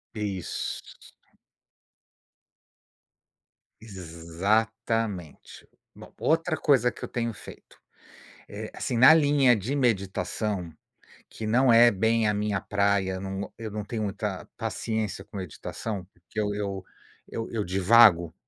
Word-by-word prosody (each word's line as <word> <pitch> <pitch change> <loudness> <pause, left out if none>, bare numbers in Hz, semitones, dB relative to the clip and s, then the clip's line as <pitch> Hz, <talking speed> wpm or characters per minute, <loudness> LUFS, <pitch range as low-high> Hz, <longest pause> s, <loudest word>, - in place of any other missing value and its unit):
Isso. 100 -4 -4 3.0
Exatamente. 100 +1 -3 0.3
Bom, - - -13
outra 165 0 +1
coisa 125 -5 +3
que - - -13
eu - - -5
tenho 115 -2 -2
feito, - - -13 0.7
eh, - - -7
assim, 120 - -3
na 130 +7 +9
linha 145 -5 +4
de 115 +8 -3
meditação, 100 - -1 0.6
que 110 - -7
não 125 +3 +4
é 120 +1 +7
bem 110 +3 +1
a 105 - +1
minha 105 -1 -1
praia, 100 -2 0
num 95 +1 -4
eu 110 -2 -6
não 105 -1 -5
tenho 110 0 -4
muita 100 -2 -4
paciência 110 -3 -3
com - - -12
meditação, 95 +2 -5
porque 90 +5 -7
eu 105 - 0
eu 100 -2 -4 0.4
eu 115 - -5
eu 110 -3 -2
divago, 90 -3 +5
105 Hz, 115 wpm, -26 LUFS, 95-115 Hz, 3.0 s, na